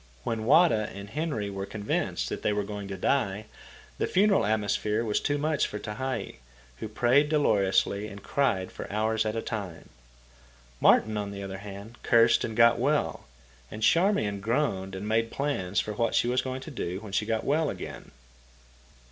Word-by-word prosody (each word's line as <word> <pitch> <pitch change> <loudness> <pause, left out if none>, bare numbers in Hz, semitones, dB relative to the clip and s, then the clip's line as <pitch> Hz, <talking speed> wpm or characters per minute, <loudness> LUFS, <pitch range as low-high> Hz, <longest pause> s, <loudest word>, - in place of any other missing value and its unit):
When 110 -1 -2
Wada 130 -6 +4
and 100 +1 -9
Henry 135 -9 -2
were 95 0 -5
convinced 100 - -2
that - - -4
they - - +1
were 105 0 0
going 100 0 -6
to 95 -1 -5
die, 105 -1 0 0.5
the - - +1
funeral 195 - +3
atmosphere 105 +1 0
was 105 -2 +1
too 145 - 0
much 150 0 +1
for 105 - -6
Tehei, 110 +6 -4 0.4
who - - -5
prayed 125 +7 +3
dolorously 105 -7 +2
and 100 -1 -10
cried 100 -10 0
for - - -8
hours 110 +1 0
at 110 - -2
a 115 - -2
time. 95 -7 -6 0.9
Martin, 110 - +4
on 105 -1 -3
the 100 0 -6
other 95 0 -6
hand, 100 +3 -10
cursed 115 -1 +4
and 110 -1 -4
got 115 0 +6
well, - - 0 0.4
and 110 +1 -7
Charmian 140 - +3
groaned 100 -4 -1
and 100 +2 -5
made 115 +1 +1
plans 100 -11 -1
for 105 - -2
what 115 +2 0
she - - +3
was 125 +1 +2
going 130 0 -5
to 155 - -8
do 95 -8 -4
when 105 -3 -9
she 105 - 0
got 110 -1 0
well 155 +2 +1
again. - - -7
110 Hz, 180 wpm, -28 LUFS, 100-130 Hz, 0.9 s, got